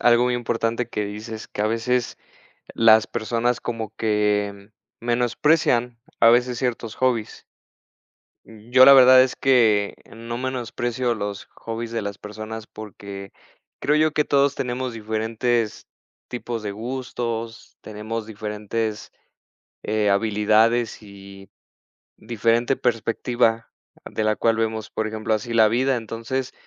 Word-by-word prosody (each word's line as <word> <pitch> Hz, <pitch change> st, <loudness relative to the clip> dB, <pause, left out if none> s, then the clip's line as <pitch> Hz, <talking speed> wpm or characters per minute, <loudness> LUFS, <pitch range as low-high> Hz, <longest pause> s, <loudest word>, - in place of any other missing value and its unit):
algo 120 Hz, 0 st, +4 dB
muy 125 Hz, 0 st, +1 dB
importante 115 Hz, 0 st, -1 dB
que 105 Hz, -, -3 dB
dices, 110 Hz, +2 st, -7 dB
que, -, -, -7 dB
a -, -, +2 dB
veces, 115 Hz, +2 st, -1 dB, 0.6 s
las 110 Hz, -1 st, +5 dB
personas 120 Hz, +1 st, -1 dB
como 115 Hz, -3 st, -5 dB
que 105 Hz, -2 st, -1 dB, 0.3 s
menosprecian, 120 Hz, 0 st, +1 dB, 0.2 s
a 115 Hz, -, +7 dB
veces, 120 Hz, +1 st, +2 dB
ciertos 120 Hz, -3 st, -3 dB
hobbies. 120 Hz, -4 st, -1 dB, 1.0 s
Yo, 120 Hz, +4 st, +3 dB
la 140 Hz, -, +9 dB
verdad 130 Hz, -1 st, +8 dB
es 130 Hz, -, -1 dB
que 110 Hz, -6 st, +3 dB, 0.2 s
no 115 Hz, +1 st, -6 dB
menosprecio 120 Hz, -1 st, -2 dB
los 100 Hz, -1 st, -5 dB
hobbies 115 Hz, 0 st, -6 dB
de 115 Hz, -1 st, -2 dB
las 100 Hz, 0 st, -5 dB
personas, 110 Hz, +1 st, -8 dB
porque 100 Hz, -3 st, -10 dB, 0.5 s
creo 150 Hz, -, +2 dB
yo 155 Hz, 0 st, +3 dB
que 150 Hz, -, +1 dB
todos 140 Hz, -1 st, +2 dB
tenemos 125 Hz, 0 st, -3 dB
diferentes 110 Hz, +1 st, -2 dB, 0.4 s
tipos 120 Hz, -2 st, -5 dB
de 105 Hz, -, -4 dB
gustos, 115 Hz, 0 st, -5 dB
tenemos 110 Hz, +1 st, -6 dB
diferentes, 105 Hz, 0 st, -4 dB, 0.7 s
eh, 105 Hz, -1 st, 0 dB
habilidades 110 Hz, +3 st, +2 dB
y 100 Hz, -1 st, -13 dB, 0.7 s
diferente 115 Hz, +3 st, 0 dB
perspectiva, 115 Hz, 0 st, 0 dB, 0.4 s
de 110 Hz, -, -3 dB
la 110 Hz, 0 st, +2 dB
cual 115 Hz, -1 st, +2 dB
vemos, 110 Hz, -1 st, -2 dB
por 110 Hz, -, -2 dB
ejemplo, 110 Hz, 0 st, -2 dB
así 115 Hz, +2 st, -3 dB
la 110 Hz, -1 st, +6 dB
vida. 130 Hz, +4 st, +1 dB
Entonces, 115 Hz, +3 st, -4 dB
115 Hz, 125 wpm, -23 LUFS, 110-120 Hz, 1.0 s, la